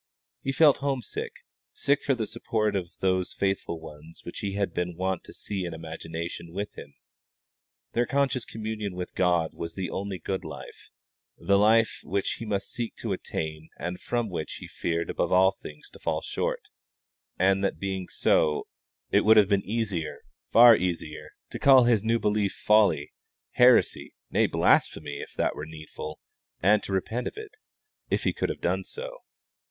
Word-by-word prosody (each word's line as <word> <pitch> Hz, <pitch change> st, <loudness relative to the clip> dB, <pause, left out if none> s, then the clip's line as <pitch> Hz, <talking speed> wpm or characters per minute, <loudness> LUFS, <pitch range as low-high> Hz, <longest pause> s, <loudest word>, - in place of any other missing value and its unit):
He 135 Hz, -, -1 dB
felt 145 Hz, +1 st, +5 dB
homesick, 135 Hz, -4 st, -3 dB, 0.4 s
sick 140 Hz, 0 st, +1 dB
for 135 Hz, -, +1 dB
the 115 Hz, -3 st, -2 dB
support 105 Hz, -1 st, -1 dB
of 90 Hz, -3 st, -2 dB
those 95 Hz, -1 st, +1 dB
faithful 95 Hz, -4 st, -1 dB
ones 80 Hz, 0 st, -12 dB
which 85 Hz, -, -7 dB
he 100 Hz, -1 st, -3 dB
had 100 Hz, -3 st, -1 dB
been 90 Hz, -1 st, -2 dB
wont 95 Hz, -1 st, -1 dB
to -, -, -11 dB
see 100 Hz, -2 st, -4 dB
in 85 Hz, -2 st, -4 dB
imagination 80 Hz, +1 st, -6 dB
with 100 Hz, +2 st, -4 dB
him: 70 Hz, -, -11 dB, 1.0 s
their 120 Hz, +1 st, +1 dB
conscious 135 Hz, -3 st, +1 dB
communion 110 Hz, -4 st, -5 dB
with 90 Hz, 0 st, -5 dB
God 85 Hz, -3 st, +2 dB
was 85 Hz, -1 st, -6 dB
the 95 Hz, -2 st, -3 dB
only 100 Hz, 0 st, -3 dB
good 95 Hz, +3 st, -3 dB
life, -, -, -10 dB, 0.5 s
the 100 Hz, +3 st, +3 dB
life 110 Hz, +2 st, +4 dB
which 100 Hz, +1 st, -1 dB
he 115 Hz, -, -5 dB
must 100 Hz, -2 st, -2 dB
seek 120 Hz, -2 st, -4 dB
to 110 Hz, -4 st, -3 dB
attain 80 Hz, -3 st, -5 dB
and 90 Hz, +1 st, -4 dB
from 120 Hz, -2 st, -1 dB
which 85 Hz, -5 st, -4 dB
he -, -, -9 dB
feared 85 Hz, 0 st, -2 dB
above -, -, -1 dB
all 95 Hz, +1 st, +6 dB
things 75 Hz, 0 st, -10 dB
to -, -, -14 dB
fall -, -, -1 dB
short; -, -, -2 dB, 0.8 s
and 95 Hz, +1 st, +3 dB
that 100 Hz, -, 0 dB
being 95 Hz, -2 st, -3 dB
so, 75 Hz, -1 st, +2 dB, 0.5 s
it -, -, +5 dB
would 110 Hz, +1 st, +6 dB
have 105 Hz, -2 st, +6 dB
been 100 Hz, -1 st, +3 dB
easier, 100 Hz, -7 st, -2 dB, 0.3 s
far 120 Hz, 0 st, +9 dB
easier, 85 Hz, -5 st, -3 dB, 0.2 s
to -, -, -5 dB
call 135 Hz, -2 st, +7 dB
his 115 Hz, -4 st, +3 dB
new 115 Hz, +1 st, +2 dB
belief 105 Hz, -2 st, +1 dB
folly, 105 Hz, 0 st, +3 dB, 0.4 s
heresy, 125 Hz, 0 st, +4 dB, 0.2 s
nay, -, -, +3 dB
blasphemy 70 Hz, -, +2 dB
if -, -, -9 dB
that -, -, 0 dB
were 75 Hz, -, -6 dB
needful, 75 Hz, -1 st, -8 dB, 0.4 s
and 105 Hz, +3 st, +4 dB
to -, -, -7 dB
repent 110 Hz, +6 st, -1 dB
of -, -, -7 dB
it, 430 Hz, -2 st, -8 dB, 0.6 s
if -, -, 0 dB
he -, -, +1 dB
could -, -, -1 dB
have -, -, -5 dB
done -, -, 0 dB
so. -, -, -8 dB
95 Hz, 175 wpm, -27 LUFS, 85-110 Hz, 1.0 s, far